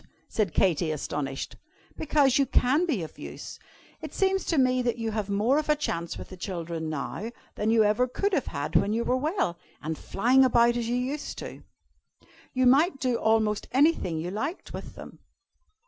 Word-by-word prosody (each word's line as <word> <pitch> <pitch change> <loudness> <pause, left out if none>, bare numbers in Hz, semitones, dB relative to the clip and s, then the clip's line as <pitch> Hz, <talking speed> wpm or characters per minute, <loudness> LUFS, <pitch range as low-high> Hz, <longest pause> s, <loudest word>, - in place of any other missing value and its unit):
said 210 -6 0
Katy, 170 0 +2
astonished. 140 -2 -4 0.4
"Because 280 -4 +3
you 275 - +3
can 285 +7 +2
be 245 - 0
of 160 - -10
use. - - -8 0.4
It - - -8
seems 385 -1 +1
to 330 - 0
me 255 -1 +3
that 245 -1 -1
you 225 -1 -2
have 210 -2 -3
more 220 +8 +2
of 310 - -5
a 300 - +5
chance 170 - -3
with - - -9
the 185 - -10
children 170 -3 -4
now, 155 +8 -4 0.2
than 210 - -1
you 225 -1 +5
ever 215 +4 +2
could 400 +10 -1
have 290 -8 +1
had 145 +2 -4
when 200 +5 +3
you 230 +1 0
were 250 - +1
well, 280 - -1 0.2
and 160 +1 -3
flying 245 +11 +3
about 240 -2 +4
as 235 -1 -2
you 240 - +1
used. 260 +4 -3
You 255 0 -8
might 275 +5 +4
do 255 -4 +1
almost 220 -2 +1
anything 270 - +2
you 170 +3 -3
liked 280 - -4
with - - -8
them." - - -11
235 Hz, 185 wpm, -27 LUFS, 185-270 Hz, 0.4 s, a